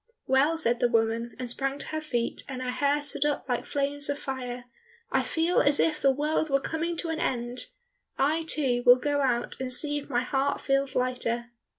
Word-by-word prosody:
"Well," 280 +5 +3
said 240 -6 +2
the - - +3
woman, 230 0 0
and 255 -1 -4
sprang 270 +3 -2
to - - -4
her 310 0 -3
feet 240 -6 -2
and 260 -2 -5
her 250 - -2
hair 285 +3 +1
stood 290 -1 0
up 295 -1 -1
like 245 -2 -2
flames 285 0 0
of 285 - 0
fire, 250 -3 -5 0.5
"I - - +3
feel 330 +2 +1
as 285 0 +3
if 305 -2 +2
the 275 - +5
world 300 +3 0
were 275 0 +3
coming 330 +4 -3
to 335 - -4
an 325 0 -2
end! 245 -3 -1 0.5
I, 315 +4 +1
too, 260 -6 +2
will 245 - +9
go 285 +2 0
out 245 -3 0
and 255 -1 -3
see 290 +3 +1
if 290 - -12
my 245 -2 +1
heart 270 +2 0
feels 275 -1 0
lighter." 240 -2 -1
275 Hz, 210 wpm, -27 LUFS, 245-295 Hz, 0.5 s, will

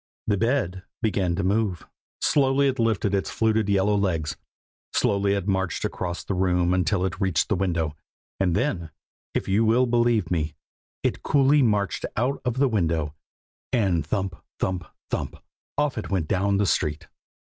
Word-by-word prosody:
The 105 - +2
bed 105 -5 0 0.2
began 95 -5 +1
to 95 - -1
move! 100 -2 0 0.4
slowly 140 -1 +3
it 130 -1 -1
lifted 110 -3 +1
its 100 - 0
fluted 110 -2 +1
yellow 100 +1 +3
legs, 85 -7 0 0.6
slowly 100 0 +2
it 100 -1 -3
marched 95 -2 0
across 90 -1 -3
the - - -3
room 90 -1 +2
until 90 +1 +1
it 95 +2 -4
reached 95 -5 +1
the - - +2
window, 85 -6 -1 0.4
and 90 -3 +2
then, 90 - -1 0.5
if - - -1
you 100 +4 +3
will 115 +3 +4
believe 120 -6 +2
me, 80 -3 -1 0.5
it - - 0
coolly 140 +1 +4
marched 105 -5 +1
out 130 +5 0
of 125 -2 -1
the 140 +1 +4
window, 80 - 0 0.6
and 95 - +2
thump! 95 +3 -2 0.2
thump! 90 -2 -1 0.3
thump! - - -2 0.4
off 145 -5 +1
it - - -6
went 90 -6 0
down 100 +3 +1
the 100 - +2
street. 75 -2 0
100 Hz, 160 wpm, -25 LUFS, 90-115 Hz, 0.6 s, will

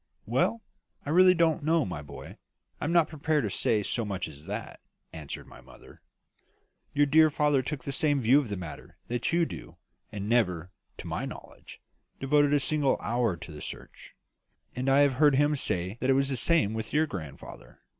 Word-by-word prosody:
"Well, 230 -1 0 0.4
I 145 - -3
really 185 +2 +6
don't 165 -2 +2
know, 160 0 +2
my 90 -6 -5
boy; 75 - -11 0.4
I - - -3
am 155 - -1
not 170 -2 +4
prepared 155 -1 -1
to 105 - -2
say 105 +1 +1
so 115 - -1
much 100 -3 -3
as 75 -1 -12
that," - - -6 0.3
answered 75 -3 -7
my - - -15
mother. - - -17 0.9
"Your 145 0 +4
dear 155 +2 +5
father 145 -2 +2
took 135 0 -5
the 140 - -4
same 145 +1 +1
view 130 +3 +5
of 135 -6 -4
the 100 - -3
matter 85 -4 -9
that 120 +5 -1
you 170 0 +2
do, - - -9 0.3
and 100 -1 -5
never, 90 -7 +1 0.3
to - - -9
my - - -3
knowledge, - - -11 0.4
devoted 145 +1 +3
a 145 - +4
single 140 0 +1
hour 115 -5 0
to 80 - -10
the 75 - -10
search. - - -10 0.6
And 130 +2 -1
I 135 +1 +5
have 140 -2 +4
heard 145 -2 +6
him 145 +2 +3
say 95 -4 -2
that 130 - 0
it - - +6
was 135 +1 +1
the 135 - 0
same 150 -5 +2
with 110 0 -5
your 155 +1 +3
grandfather. 80 - -10
135 Hz, 195 wpm, -28 LUFS, 105-150 Hz, 0.9 s, really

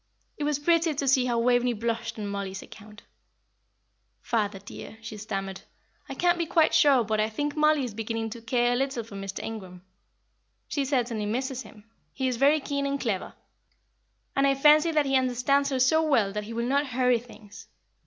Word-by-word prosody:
It 295 - -3
was 295 -1 +1
pretty 330 +1 +2
to 275 0 -2
see 260 -1 +4
how 240 -2 0
Waveney 245 +1 +2
blushed 230 +1 -3
on 210 - -4
Mollie's 200 -1 -5
account. 210 0 -14 1.2
"Father, 210 -4 -1
dear," 200 +3 -10
she 220 -1 -8
stammered, 195 -2 -5 0.5
"I 270 - -5
can't 350 +3 +2
be 335 - -1
quite 320 0 +3
sure 275 -6 +5
but 215 0 -1
I 215 +1 +1
think 290 +6 -3
Mollie 305 -2 +3
is 245 -4 -4
beginning 225 +1 -3
to 235 - -8
care 240 +1 +1
a - - +1
little 265 -2 -1
for 220 - -14
Mr. 195 0 -6
Ingram. 185 -5 -8 0.8
She 285 -2 -1
certainly 240 -6 -1
misses 260 +3 -2
him; 215 -4 -14 0.3
he 265 - -1
is 250 -2 -1
very 285 +4 +4
keen 280 -1 -2
and 280 0 -2
clever, 215 -8 -3 1.0
and 275 0 +3
I 275 - +3
fancy 300 +4 +5
that 305 -2 +2
he 270 0 +1
understands 260 +2 +2
her 265 -2 -1
so 290 +5 +4
well 235 -11 +2
that 210 0 -4
he 230 - -7
will 235 +1 -2
not 280 +2 +1
hurry 250 -1 +2
things. 220 -3 -14
245 Hz, 195 wpm, -27 LUFS, 220-280 Hz, 1.2 s, sure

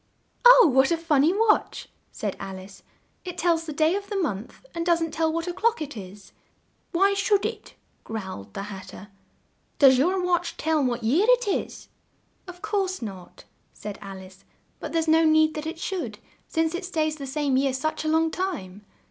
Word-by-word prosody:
"Oh, - - +9
what 265 +1 +4
a 335 - +1
fun 320 -4 +2
ny 310 +4 +4
watch!" 425 +2 +1 0.2
said - - -4
Al 190 -1 -6
ice. 190 +1 -12 0.4
"It 360 -1 -7
tells 330 -1 +1
the - - -3
day 310 +3 +2
of 400 +1 -4
the 415 - -4
month 250 - -3
and 335 -1 -2
doesn't 335 -2 +1
tell 320 0 0
what 330 +1 -2
o'clock 445 +6 0
it 295 -2 -6
is!" 195 -1 -10 0.6
"Why 390 +3 +3
should 405 0 +1
it?" 440 -1 -6 0.3
growled 190 - -7
the - - -4
Hat 195 -2 -8
ter. 205 - -11 0.7
"Does 265 -3 +6
your 365 +7 +2
watch 350 -1 0
tell 315 -1 +1
what 245 -2 -1
year 310 - +3
it - - +4
is?" 395 - -3 0.6
"Of 360 +1 -11
course 390 - -1
not," 190 -5 -9 0.3
said 210 -1 -8
Al 195 -1 -8
ice, 190 0 -14 0.4
"but - - -6
there's 330 -1 0
no 320 +1 +5
need 315 0 +4
that 305 0 -5
it 325 - -5
should, 370 +2 -4 0.3
since 325 0 0
it 355 +3 -4
stays 310 -4 -1
the 275 -2 -7
same 285 -1 0
year 270 +1 +2
such 290 +5 -2
a - - -3
long 320 +1 +2
time." 210 - -4
315 Hz, 190 wpm, -25 LUFS, 250-360 Hz, 0.7 s, Oh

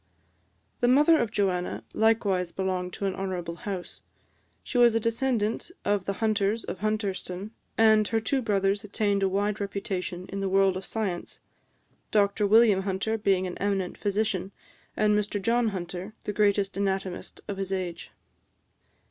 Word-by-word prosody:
The 245 - +2
mother 300 +5 +6
of 230 - 0
Joanna 185 -4 -1
likewise 205 -5 +2
belonged 185 -1 -2
to 200 - -4
an 195 - 0
honourable 180 -3 -4
house: 190 -3 -6 0.6
she 245 - -1
was 240 -2 +6
a - - +4
descendant 230 0 0 0.2
of 205 -2 +1
the 200 - -1
Hunters 215 +1 0
of - - -6
Hunterston; 205 -2 -2 0.3
and 220 -1 +5
her 225 - +1
two 260 +5 0
brothers 200 -3 +1
attained 205 -1 0
a 195 - +2
wide 205 +2 -1
reputation 190 -2 -3
in 195 - -4
the 195 -1 -1
world 195 0 +3
of 190 +1 -5
science 195 -6 -3 0.7
Dr 205 0 +2
William 215 -2 +5
Hunter 195 +3 -1
being 195 -3 +1
an 180 - -5
eminent 195 -3 -1
physician, 200 -2 -1 0.5
and 210 0 +3
Mr 205 0 0
John 230 +4 +2
Hunter 185 +1 -5
the 210 - -3
greatest 200 -1 +2
anatomist 190 -2 -2
of 200 -2 -4
his 195 -1 -3
age. 180 -3 -3
200 Hz, 155 wpm, -27 LUFS, 190-215 Hz, 0.7 s, mother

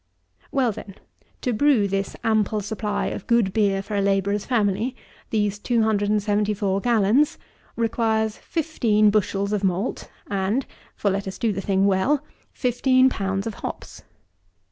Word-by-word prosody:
26. - - -38
Well, 260 -4 +2
then, 195 -1 -9 0.5
to 250 - 0
brew 245 -4 +3
this 195 0 -2
ample 215 -1 +1
supply 210 0 -2
of - - -7
good 230 -5 +2
beer 200 -2 +1
for 205 +1 -5
a 200 - +2
labourer's 200 +1 +1
family, 225 +1 0 0.3
these 205 -2 0
274 210 -3 +1
gallons, 235 +5 +3 0.4
requires 220 -1 0
fifteen 230 -10 +1
bushels 200 -1 0
of 205 -1 -1
malt 190 +4 -1 0.2
and 200 +6 -1 0.3
(for 200 - 0
let 195 +1 -2
us 190 - -5
do 225 -3 0
the 195 - -3
thing 195 0 +1
well) 220 +10 +2 0.3
fifteen 255 +1 +3
pounds 195 -4 -2
of 225 - -3
hops. - - -7
210 Hz, 145 wpm, -23 LUFS, 200-230 Hz, 0.5 s, brew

